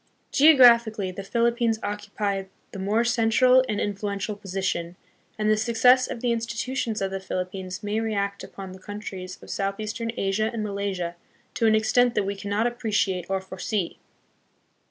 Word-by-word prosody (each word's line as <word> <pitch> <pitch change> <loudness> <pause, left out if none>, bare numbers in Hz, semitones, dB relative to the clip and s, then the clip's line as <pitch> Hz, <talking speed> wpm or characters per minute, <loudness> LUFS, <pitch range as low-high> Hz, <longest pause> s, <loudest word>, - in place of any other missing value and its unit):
Geographically, 235 -9 +6
the 190 - -7
Philippines 235 +2 +1
occupy 205 -1 -3 0.3
the 195 - -7
more 210 +4 +1
central 240 +2 +4
and 210 -1 -1
influential 205 0 -2
position, 190 -4 -3 0.4
and 215 0 0
the 215 - +5
success 235 +3 +4
of 235 - -5
the 245 - +1
institutions 230 -1 -2
of 190 - -2
the 195 - -3
Philippines 185 0 -5
may 205 +1 -1
react 200 -3 -2
upon 190 -1 -9
the 190 - -11
countries 190 -2 -7
of - - -9
southeastern 215 +4 -3
Asia 195 +3 0
and 230 -2 -3
Malaysia 200 -4 -3 0.4
to 230 - +2
an 220 - +5
extent 240 +3 +3
that 210 - +2
we 200 +1 -3
cannot 205 +3 -1
appreciate 215 -6 0
or 195 0 0
foresee. 190 0 -4
210 Hz, 155 wpm, -25 LUFS, 195-230 Hz, 0.4 s, Geographically